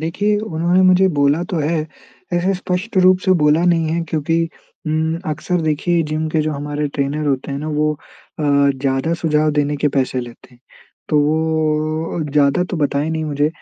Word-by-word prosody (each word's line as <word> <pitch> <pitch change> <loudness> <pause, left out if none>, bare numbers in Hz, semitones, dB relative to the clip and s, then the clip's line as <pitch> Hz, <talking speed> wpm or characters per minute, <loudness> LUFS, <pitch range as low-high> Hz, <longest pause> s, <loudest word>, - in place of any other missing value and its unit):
देखिए 200 +6 0
उन्होंने 175 -3 0
मुझे 185 +1 +5
बोला 145 +4 +3
तो 175 - -1
है। 155 +1 -1 0.5
ऐसे 180 +3 +1
स्पष्ट 185 +4 -4
रूप 185 0 +5
से 185 - +4
बोला 150 +3 +3
नहीं 165 -2 +2
है 170 - 0
क्योंकि 165 +2 0 0.4
उम, 160 +1 0
अक्सर 160 +3 -2
देखिए 160 +2 +1
जिम 155 +1 -1
के 160 - +1
जो 155 0 -1
हमारे 145 +1 -3
ट्रेनर 145 +2 -1
होते 140 0 -1
हैं 140 - -3
ना, 155 - -5
वो 150 0 +1 0.5
अ, - - -3
ज़्यादा 140 +1 +1
सुझाव 155 -2 +1
देने 145 0 0
के 150 +1 +1
पैसे 130 -1 0
लेते 120 -1 -11
हैं। 120 - -25 0.5
तो 150 - +2
वो 155 +1 0
ज़्यादा 145 +4 +3
तो 180 - -2
बताए 145 0 0
नहीं 160 -1 -2
मुझे 145 0 0
155 Hz, 180 wpm, -18 LUFS, 145-170 Hz, 0.5 s, मुझे